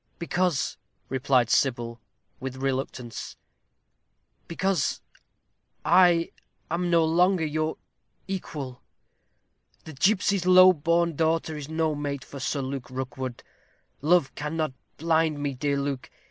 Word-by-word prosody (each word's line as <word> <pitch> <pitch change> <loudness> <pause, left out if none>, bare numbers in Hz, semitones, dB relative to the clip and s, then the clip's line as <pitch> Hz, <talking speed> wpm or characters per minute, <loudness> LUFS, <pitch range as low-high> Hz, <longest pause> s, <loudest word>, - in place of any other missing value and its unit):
"Because," 175 -2 0 0.3
replied 130 -2 +2
Sybil, 120 -3 +1 0.4
with 130 0 -5
reluctance 130 -2 -4 1.1
"because 190 +2 0 0.9
I 175 -1 +5 0.4
am 175 +1 0
no 165 -1 +4
longer 175 +1 +3
your 155 +1 -1 0.5
equal. 150 -9 -5 1.0
The 160 - -9
gipsy's 190 +3 +2
low 185 0 +8
born 170 +1 +1
daughter 160 0 0
is 150 -1 -7
no 160 -1 0
mate 145 -2 -4
for 140 - -9
Sir 140 +2 -1
Luke 130 -1 -5
Rookwood. 130 -1 -5 0.6
Love 160 -1 +3
cannot 155 -1 -2 0.2
blind 160 -1 +2
me, 145 -1 -2
dear 140 +2 -1
Luke. 140 -2 -3
155 Hz, 110 wpm, -26 LUFS, 135-170 Hz, 1.1 s, low